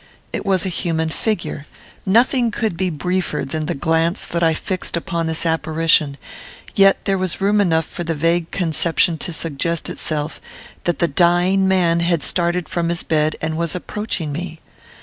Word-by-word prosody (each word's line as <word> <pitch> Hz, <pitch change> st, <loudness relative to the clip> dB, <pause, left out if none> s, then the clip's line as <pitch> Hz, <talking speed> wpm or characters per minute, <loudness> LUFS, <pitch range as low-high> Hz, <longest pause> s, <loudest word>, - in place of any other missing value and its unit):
It -, -, -4 dB
was 190 Hz, -1 st, +2 dB
a -, -, 0 dB
human 160 Hz, -2 st, -1 dB
figure. 170 Hz, -7 st, -3 dB, 0.4 s
Nothing 240 Hz, +4 st, +4 dB
could 220 Hz, -3 st, -1 dB
be 185 Hz, +2 st, 0 dB
briefer 180 Hz, +3 st, -1 dB
than 155 Hz, +2 st, -3 dB
the 175 Hz, -, -1 dB
glance 165 Hz, +5 st, +1 dB
that 170 Hz, -, -2 dB
I 165 Hz, -1 st, +3 dB
fixed 185 Hz, 0 st, -3 dB
upon 170 Hz, -1 st, -2 dB
this 160 Hz, +1 st, -1 dB
apparition; 160 Hz, -3 st, +2 dB, 0.6 s
yet 195 Hz, -1 st, +4 dB
there 195 Hz, -1 st, +1 dB
was 185 Hz, -2 st, -2 dB
room 205 Hz, +1 st, +3 dB
enough 165 Hz, -4 st, +2 dB
for 175 Hz, -, -6 dB
the 165 Hz, -1 st, -2 dB
vague 165 Hz, +2 st, +1 dB
conception 170 Hz, -1 st, +1 dB
to 175 Hz, -, -3 dB
suggest 165 Hz, +1 st, -2 dB
itself, 150 Hz, 0 st, -3 dB, 0.4 s
that 175 Hz, -, +1 dB
the 170 Hz, -, +2 dB
dying 175 Hz, +4 st, +3 dB
man 175 Hz, -3 st, +3 dB
had 170 Hz, -2 st, +1 dB
started 175 Hz, -1 st, +1 dB
from 170 Hz, 0 st, -1 dB
his 170 Hz, 0 st, -1 dB
bed 155 Hz, -1 st, +1 dB
and 160 Hz, 0 st, -1 dB
was 170 Hz, 0 st, 0 dB
approaching 180 Hz, -4 st, -3 dB
me. 165 Hz, +2 st, -5 dB
170 Hz, 170 wpm, -20 LUFS, 160-185 Hz, 0.6 s, Nothing